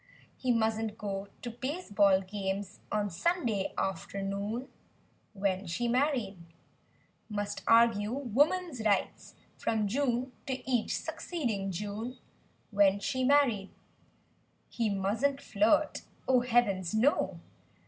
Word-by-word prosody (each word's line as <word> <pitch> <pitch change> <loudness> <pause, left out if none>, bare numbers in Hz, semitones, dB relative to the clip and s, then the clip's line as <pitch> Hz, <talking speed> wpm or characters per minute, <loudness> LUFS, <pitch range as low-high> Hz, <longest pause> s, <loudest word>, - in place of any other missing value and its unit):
He 255 - 0
musn't 220 -1 0
go 200 -2 -4 0.2
to 240 - -4
baseball 220 - +2
games 195 0 -4
on 210 -1 0
Sunday 225 - 0
after¬ 195 0 -2
noon— 205 +6 -3 0.4
' - - -35 0.3
When 195 -1 -1
she 175 +8 -1
married; 245 - +1 0.9
Must 205 -1 -3
argue 230 -2 +5
"woman's 280 - +1
rights" 205 -3 0 0.2
from 215 -2 0
June 255 +2 0 0.2
to 260 -1 -4
each 245 -4 +1
succeeding 230 - -3
June— 210 +6 -4 0.5
When 200 -1 +4
she 260 +5 -1
married; 255 -8 +3 1.0
He 230 -2 0
musn't 215 +8 0
flirt. 230 +8 +2 0.3
Oh, 260 -1 +5
heavens 225 -7 +1
no! 250 +7 +2
220 Hz, 110 wpm, -31 LUFS, 200-255 Hz, 1.0 s, argue